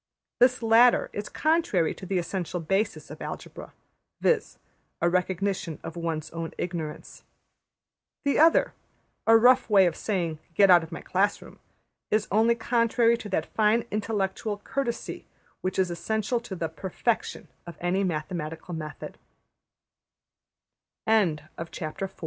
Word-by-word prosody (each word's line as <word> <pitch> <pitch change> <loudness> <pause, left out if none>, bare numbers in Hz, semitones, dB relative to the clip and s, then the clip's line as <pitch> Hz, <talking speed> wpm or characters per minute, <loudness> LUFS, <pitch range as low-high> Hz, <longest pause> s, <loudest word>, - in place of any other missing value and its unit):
'' - - -64
This 250 0 +4
latter 230 +2 +5
is 205 0 -5
contrary 310 - +1
to 190 - -10
the 190 0 0
essential 175 0 -3
basis 195 +6 -1
of - - -10
Algebra, - - -7 0.5
viz., 455 -3 +1 0.4
a 170 - +2
recognition 185 -2 -1
of 165 - -7
one's 160 -2 -3
own 165 0 -5
ignorance. 165 -4 -5 1.0
The 280 - +2
other, 325 +2 +5 0.5
a 225 0 +8
rough 250 +2 +5
way 195 -3 +6
of 170 -3 0
saying 170 -7 -2 0.2
``Get 195 -2 +6
out 175 -1 +8
of 165 +1 -9
my 165 - -6
class 195 +2 +1
room,'' - - -14 0.5
is 215 0 +1
only 225 +3 +4
contrary 235 0 +2
to 215 - -8
that 160 -4 0
fine 220 +2 +3
intellectual 210 0 -2
courtesy 240 -4 -4 0.3
which 185 +1 -2
is 185 -2 +1
essential 220 +7 -1
to 220 -5 -7
the 165 -2 -2
\emph{perfec 190 +7 -2
200 Hz, 120 wpm, -27 LUFS, 175-230 Hz, 1.0 s, a